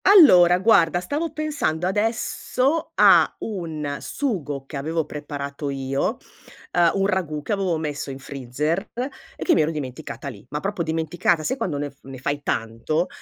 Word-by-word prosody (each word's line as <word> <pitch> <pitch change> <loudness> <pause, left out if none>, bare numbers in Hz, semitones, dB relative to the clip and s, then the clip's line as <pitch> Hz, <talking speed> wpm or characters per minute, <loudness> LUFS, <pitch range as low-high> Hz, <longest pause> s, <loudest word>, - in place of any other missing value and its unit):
Allora, 180 - +8
guarda 175 -4 +4
stavo 295 - -2
pensando 285 - -1
adesso 240 - 0
a - - +6
un 160 -8 -4
sugo, 150 - -3
che 145 - -9
avevo 160 +3 -1
preparato 145 -1 -5
io, 135 0 -1 0.6
uhm, 175 -1 +5
un 195 0 +2
ragù 175 -7 -1
che - - -5
avevo 190 -4 0
messo 150 -2 -4
in 135 - -5
freezer 140 +5 -2 0.6
e - - -5
che 350 - +4
mi - - +4
ero 155 - +2
dimenticata 145 -1 -6
lì. 135 - -8
Ma 150 - -3
proprio 195 +1 -3
dimenticata, 160 +1 0
sai 260 - 0
quando 175 - -2
ne 145 0 -3
f 140 - -32
ne 135 0 -9
fai 145 +3 -2
tanto? 115 +9 -1
160 Hz, 165 wpm, -23 LUFS, 145-190 Hz, 0.6 s, Allora